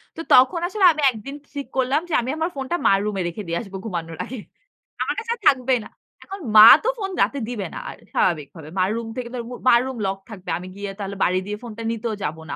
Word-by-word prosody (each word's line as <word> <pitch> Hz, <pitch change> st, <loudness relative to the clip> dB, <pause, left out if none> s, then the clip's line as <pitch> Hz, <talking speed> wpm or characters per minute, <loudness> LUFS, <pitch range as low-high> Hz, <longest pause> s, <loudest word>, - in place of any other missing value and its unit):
তো 330 Hz, -, -5 dB
তখন 260 Hz, +8 st, +6 dB
আসলে 390 Hz, +1 st, +1 dB
আমি 305 Hz, -, -4 dB
১ 250 Hz, -, -5 dB
দিন 275 Hz, -, -6 dB, 0.2 s
ঠিক 280 Hz, -1 st, -4 dB
করলাম 265 Hz, +3 st, +2 dB
যে -, -, -4 dB
আমি 245 Hz, -, -5 dB
আমার 325 Hz, +2 st, 0 dB
ফোনটা 270 Hz, +4 st, -2 dB
মার 195 Hz, -, +5 dB
রুমে 205 Hz, -3 st, -2 dB
রেখে 175 Hz, +5 st, -5 dB
দিয়ে 170 Hz, 0 st, -1 dB
আসব 195 Hz, -4 st, -12 dB
ঘুমানোর 165 Hz, -5 st, -5 dB
আগে। 255 Hz, -, -7 dB, 0.6 s
আমার -, -, 0 dB
কাছে 460 Hz, -, -4 dB
আর -, -, -25 dB
থাকবেই 255 Hz, -1 st, +3 dB
না। -, -, -12 dB, 0.3 s
এখন 390 Hz, +1 st, -8 dB, 0.2 s
মা 215 Hz, 0 st, +11 dB, 0.2 s
তো -, -, -1 dB
ফোন 390 Hz, -3 st, -4 dB
রাতে 280 Hz, -, +1 dB
দিবে 220 Hz, -6 st, -4 dB
না -, -, -6 dB
আ -, -, -5 dB, 0.2 s
স্বাভাবিকভাবে। 155 Hz, -2 st, -1 dB
মার 185 Hz, +1 st, +2 dB
রুম 230 Hz, -1 st, -5 dB
থেকে 250 Hz, -1 st, -4 dB
তো -, -, -4 dB
আর -, -, -4 dB
মু -, -, -7 dB, 0.2 s
মার 235 Hz, -, +7 dB
রুম 265 Hz, -1 st, -5 dB
লক 190 Hz, 0 st, -2 dB
থাকবে। 190 Hz, -5 st, -9 dB
আমি 180 Hz, +1 st, -8 dB
গিয়ে 200 Hz, 0 st, -5 dB
তাহলে 200 Hz, 0 st, -5 dB
বারি 185 Hz, -, +2 dB
দিয়ে 210 Hz, +1 st, -4 dB
ফোনটা 230 Hz, -1 st, -8 dB
নিতেও 230 Hz, 0 st, -3 dB
যাবো 160 Hz, -1 st, -4 dB
না। -, -, -3 dB
230 Hz, 250 wpm, -22 LUFS, 195-270 Hz, 0.6 s, মা